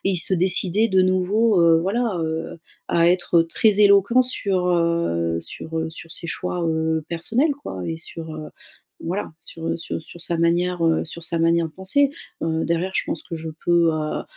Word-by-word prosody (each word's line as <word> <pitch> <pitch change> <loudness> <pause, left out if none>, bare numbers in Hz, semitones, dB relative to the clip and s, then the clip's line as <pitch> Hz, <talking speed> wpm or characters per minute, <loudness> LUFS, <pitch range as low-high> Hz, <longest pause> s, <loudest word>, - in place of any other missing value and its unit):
se 180 +2 0
décidait 185 +4 +2
de 190 -2 +3
nouveau, 185 +3 +2
heu, 165 -1 +5
voilà, 220 +3 -1
heu, 160 0 -3 0.3
à 170 0 +3
être 175 -1 +3
très 210 +5 +2
éloquent 200 +4 +5
sur, 195 -7 -1
heu, 170 - +1
sur 160 0 -4
sur 165 0 -10
ses 170 - -6
choix, 175 +1 -3
heu, 160 -1 0
personnels 230 - 0
quoi 95 -1 -6
et 165 - -3
sur, 160 0 -8
heu, 155 -1 -7 0.5
voilà 180 +2 -3
sur 165 +1 -5
sur - - -5
sur 170 +2 -12
sa 170 0 -2
manière 175 +1 +1
heu, 165 -1 +2
sur 165 +1 -5
sa 170 0 -1
manière 165 0 +2
de - - -15
penser. 275 +10 +2 0.3
Heu, 160 0 0
derrière, 170 +3 -1
je - - +1
pense - - -4
que 170 - -7
je 160 0 -6 0.2
peux, 170 -1 +4
heu 155 -1 -3
170 Hz, 180 wpm, -22 LUFS, 165-190 Hz, 0.5 s, heu